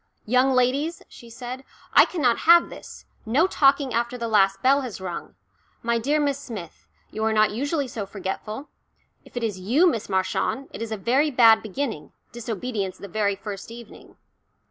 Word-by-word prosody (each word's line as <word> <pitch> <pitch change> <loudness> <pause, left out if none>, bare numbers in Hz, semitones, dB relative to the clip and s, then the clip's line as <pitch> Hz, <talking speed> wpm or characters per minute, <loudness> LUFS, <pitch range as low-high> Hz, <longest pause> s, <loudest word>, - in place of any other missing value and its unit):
"Young 255 +4 +3
ladies," 270 +6 +1
she 235 - -14
said, 250 +3 -7 0.3
"I - - +8
cannot 260 -10 +1
have 340 0 +7
this. - - -11 0.2
No 255 +9 +2
talking 275 -6 +3
after 235 +2 -1
the 235 -1 -3
last 195 -3 +2
bell 275 +2 +4
has 250 -7 -6
rung. 180 -2 -6 0.5
My 235 0 +1
dear 290 +6 +1
Miss 285 -2 0
Smith, 220 - -9 0.2
you 220 - -4
are 220 - +2
not 215 -1 +3
usually 285 +5 -1
so 225 -6 -5
forgetful. 210 +7 -5 0.6
If - - -12
it 240 - -2
is 210 -5 -2
you, 245 - +3
Miss 230 -11 -1
Marchant, 190 +8 -1
it - - -7
is 230 -1 -4
a 220 - -2
very 260 +9 +2
bad 230 -5 +6
beginning, 220 - -5 0.2
disobedience 220 -4 -4
the 200 - -9
very 200 +1 0
first 200 0 -8
evening." 235 -1 -13
235 Hz, 175 wpm, -24 LUFS, 210-270 Hz, 0.6 s, I